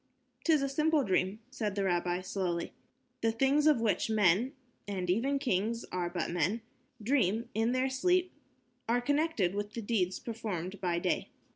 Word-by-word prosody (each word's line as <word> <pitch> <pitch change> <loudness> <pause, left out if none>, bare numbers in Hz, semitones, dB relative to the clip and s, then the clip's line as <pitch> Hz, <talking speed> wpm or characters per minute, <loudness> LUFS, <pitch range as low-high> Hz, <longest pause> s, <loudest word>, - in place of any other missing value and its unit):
"'Tis 310 -4 +4
a - - +1
simple 305 +2 +2
dream," 190 +1 0
said 210 -6 -2
the 200 - 0
rabbi, 175 -1 0
slowly. 180 -2 -2 0.5
"The 225 - +2
things 270 +6 +3
of 300 -6 +5
which 220 -1 +1
men 215 - +3 0.3
and 190 -3 -3
even 265 +9 +1
kings 230 -2 -1
are 175 -1 -1
but 175 -2 -2
men 180 +7 0 0.4
dream 230 -3 +1
in 225 +2 +1
their 255 +1 +1
sleep 360 +8 +1 0.6
are 240 +1 +3
connected 285 - +1
with 205 +1 -4
the 230 - -3
deeds 195 -4 0
performed 205 -5 -5
by 175 -2 0
day. 170 - -1
220 Hz, 160 wpm, -31 LUFS, 185-265 Hz, 0.6 s, of